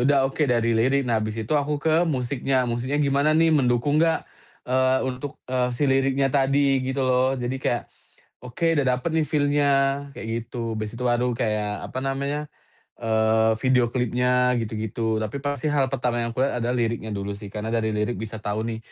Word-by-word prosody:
udah 140 0 +4
oke 150 +2 0
dari 115 -3 +1
lirik. 130 +5 +3
Nah 115 - +2
abis 110 +1 -2
itu 110 +8 0
aku 145 0 -1
ke 160 +2 +3
musiknya, 130 -3 0
musiknya 125 +5 -1
gimana 140 +1 +2
nih 160 0 +4
mendukung 125 +2 +2
gak, 165 0 +1 0.4
eee, 130 0 +2
untuk, 130 +2 -6
eee, 125 -1 +1
si 140 +3 0
liriknya 135 0 +2
tadi 135 -1 +2
gitu 130 +1 -2
loh. 130 +1 +2
Jadi 125 +1 -3
kayak, 120 - -1 0.6
"Oke 165 +7 0
udah 135 - +1
dapet 125 +5 0
nih 160 -1 +1
feel-nya," 145 -1 +2 0.4
kayak - - -7 0.2
gitu. 115 -2 -4
Habis 110 +1 -5
itu 125 - -6
baru 120 0 +1
kayak 105 -2 -2
apa 130 - -4
namanya, 140 +2 -1 0.6
eee, 110 0 +2
video 125 -2 +3
klipnya 125 0 +2
gitu-gitu, 110 0 -2
tapi 110 +5 -3
pasti 145 +1 -1
hal 140 -2 +2
pertama 120 -2 0
yang 115 0 -3
aku - - 0
lihat 130 -3 -1
adalah 125 +1 0
liriknya 115 -2 -1
dulu 100 +1 -3
sih, 100 -1 -9
karena 110 +1 -4
dari 110 -2 0
lirik 105 +3 -1
bisa 110 0 -5
tahu 105 0 -2
nih 110 - -4
125 Hz, 185 wpm, -24 LUFS, 115-140 Hz, 0.6 s, udah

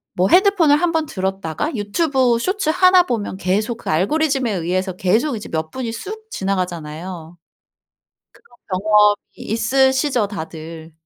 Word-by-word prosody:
뭐 185 +1 +2
핸드폰을 365 -6 +5
한번 325 -1 0
들었다가 190 - -3
유튜브 245 +3 +1
쇼츠 375 - -1
1 365 +1 +5
보면 225 - -3
계속 210 +5 -1
그 - - -8
알고리즘에 265 - +1
의해서 185 +1 -2
계속 220 - +1
이제 210 - -8
몇 160 -1 -3
분이 250 -3 -4
쑥 435 - -8
지나가잖아요. 175 -2 -4 1.1
그런 240 - -23 0.2
경험이 210 0 +4 0.2
있으시죠 260 +1 +1
다들. 160 -3 -8
215 Hz, 295 characters per minute, -19 LUFS, 185-290 Hz, 1.1 s, 핸드폰을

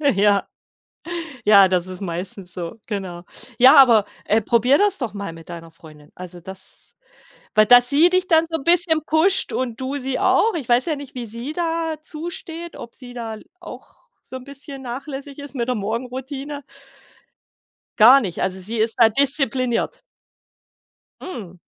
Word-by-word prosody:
Ja. 200 0 +2 1.0
Ja, 200 -2 +7
das 180 -1 0
ist 185 -1 -8
meistens 185 0 -6
so, 170 -2 -6
genau. 190 -5 -5 0.4
Ja, 255 +1 +8
aber, 235 -6 +7 0.2
äh, 220 - +2
probier 235 +5 +3
das 405 -1 +2
doch 240 -6 -3
mal 200 -4 -5
mit 165 0 -13
deiner 165 -1 -9
Freundin. 155 -2 -16
Also, 180 -1 -9
das 190 +2 -9 0.6
weil 215 - +6
dass 245 +2 +7
sie 295 +6 +5
dich 370 0 +1
dann 320 -1 +4
so 325 - -1
'n 270 - -11
bisschen 340 -2 +4
pusht 335 +5 +2
und 240 -2 -3
du 260 +2 -3
sie 265 -1 -3
auch. 450 - +3
Ich 295 -8 -5
weiß 245 +1 +3
ja 315 -3 -1
nicht, 285 -2 -10
wie 245 -2 -5
sie 235 +6 -6
dazu 325 -1 -3
steht, 335 0 -8
ob 235 - -10
sie 245 -2 -10
da 225 -2 -6 0.2
auch - - -12 0.3
so 260 - -9
'n 255 - -9
bisschen 280 0 -9
nachlässig 270 +3 -7
ist 285 0 -9
mit 240 -2 -3
der 250 - +1
Morgenroutine. 260 +6 -5 1.4
Gar 250 +6 +8
nicht. 185 -7 -4
Also 190 0 -2
sie 220 +5 -5
ist 220 +1 +1
da 230 -2 +6
diszipliniert. 265 -1 0 1.2
Hm. 200 - -8
245 Hz, 165 wpm, -21 LUFS, 200-285 Hz, 1.4 s, Ja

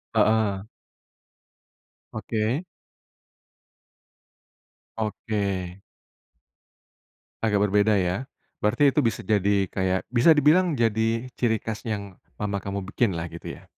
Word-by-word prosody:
Heeh. 105 -3 +2 1.5
Oke. 110 +7 -1 2.3
Oke. 100 -4 -3 1.6
Agak 105 -2 +2
berbeda 105 +1 +3
ya? 95 +8 -1 0.3
Berarti 140 +7 +3
itu - - +2
bisa 115 -2 -1
jadi 100 -1 +2
kayak, 95 -1 0
bisa 140 +7 +6
dibilang 155 +3 +4
jadi 115 +2 0
ciri 115 -2 +1
khas 110 +1 -5
yang 100 -4 -5 0.2
mama 100 -1 -2
kamu 100 0 -4
bikin 105 -8 +1
lah, 80 - -3
gitu 85 - -8
ya? - - -17
105 Hz, 100 wpm, -25 LUFS, 100-115 Hz, 2.3 s, bisa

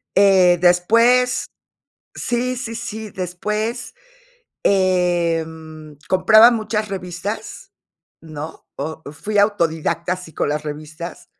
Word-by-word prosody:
Eh, 190 -3 +5
después 230 +8 +3 0.7
sí, 250 +1 -1
sí, 240 -2 -5
sí, 220 -2 -6
después, 210 +6 -4 0.7
eh, 180 -4 +2
mm, 160 -1 -11 0.2
compraba 215 +5 +7
muchas 215 -2 -2
revistas, 190 +2 -6 0.5
¿no?, 155 0 -9
o 155 +3 -5
fui 205 +8 -3
autodidacta 170 -4 +1
así 180 -3 -11
con - - -1
las 150 0 -2
revistas 155 +3 -7
185 Hz, 100 wpm, -20 LUFS, 165-215 Hz, 0.7 s, compraba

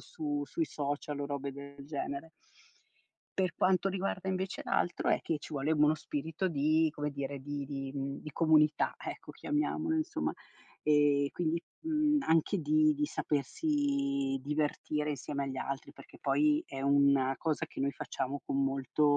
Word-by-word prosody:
su 145 -2 -3
sui 165 - -1
social 145 0 -3
o 140 - -1
robe 140 -1 -3
del 140 0 -10
genere. 140 +1 -4 1.1
Per 185 -2 +1
quanto 185 +1 +3
riguarda 190 0 -2
invece 190 0 -2
l'altro, 175 - 0
è - - +3
che 160 - -1
ci 150 - -8
vuole 140 +3 +1
uno 150 0 +5
spirito 155 +4 -2
di, 155 +1 +3
come 150 0 -2
dire, 140 0 -4
di 145 +1 -4
di, 135 -1 -4
mhmm, 140 0 -3
di 155 - -7
comunità, 155 -1 +4
ecco, - - -7
chiamiamolo 310 +1 0
insomma. 315 +2 -1 0.5
E 145 -1 +4
quindi, 170 -1 0 0.2
mhmm, 305 -2 +2
anche 165 +5 +3
di 155 +1 +4
di 150 0 0
sapersi 280 - 0
divertire 150 0 -1
insieme 140 0 -3
agli 135 -1 -4
altri, 135 +1 -4
perché - - -15
poi 300 +1 +3
è 135 - -6
una 140 -1 +4
cosa 160 0 0
che 160 - -8
noi 140 +1 +1
facciamo 140 +1 -3
con 140 - 0
molto 135 +2 0
150 Hz, 155 wpm, -32 LUFS, 140-180 Hz, 1.1 s, uno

